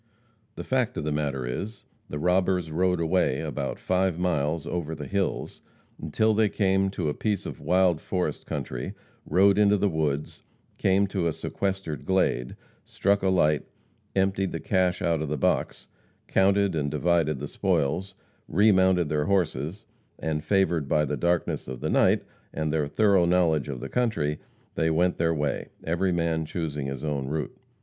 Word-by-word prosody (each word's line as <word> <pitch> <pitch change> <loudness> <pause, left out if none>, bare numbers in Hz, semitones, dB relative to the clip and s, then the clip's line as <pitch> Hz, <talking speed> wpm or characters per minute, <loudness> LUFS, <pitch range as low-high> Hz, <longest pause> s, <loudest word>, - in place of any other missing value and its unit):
The - - -6
fact 125 -1 0
of - - -2
the 75 - -1
matter 70 -4 -1
is, 100 - -5 0.2
the 75 - -4
robbers 90 0 +1
rode 90 +2 +1
away 85 +3 +1
about - - -3
five 95 -2 0
miles 80 -3 0
over 80 -2 -3
the 75 -1 -7
hills, 100 +2 -2 0.4
until 110 +8 +1
they 110 0 +3
came 95 -1 +2
to 90 -4 -3
a 75 - 0
piece 105 +1 -2
of - - -6
wild 90 -3 +2
forest 90 -1 -3
country, 60 -1 -4 0.3
rode 100 +2 +4
into 105 0 +5
the 100 - +2
woods; 75 -4 -2 0.4
came 95 +1 +3
to 95 -3 -1
a - - +1
sequestered 95 -4 -3
glade; 95 -10 0 0.3
struck 100 +1 +1
a 95 - +2
light; 75 -6 +2 0.5
emptied 95 0 +1
the 80 - -3
cash 95 +1 +1
out 85 -3 +1
of 80 - -3
the 75 - -1
box; - - -1 0.4
counted 100 0 +3
and 75 -3 -1
divided 75 0 +1
the - - -5
spoils; 90 +8 -1 0.3
remounted 95 -3 +4
their 75 0 0
horses, 90 +1 -1 0.3
and 75 -1 -2
favored 85 -5 +1
by 75 +2 +2
the 75 - -2
darkness 85 +2 0
of 65 -1 -6
the - - -2
night, - - +3 0.3
and 80 -1 -2
their 75 -2 +1
thorough 100 +2 +3
knowledge 85 -5 +2
of 65 -3 -4
the 65 - -5
country, 100 - 0 0.3
they 80 - +1
went 90 +3 +2
their 80 0 +2
way, 75 -2 -2 0.2
every 90 +3 0
man 85 -2 0
choosing 75 -3 -4
his 70 0 -5
own 70 -3 -2
route. 75 +2 -3
85 Hz, 170 wpm, -26 LUFS, 75-95 Hz, 0.5 s, into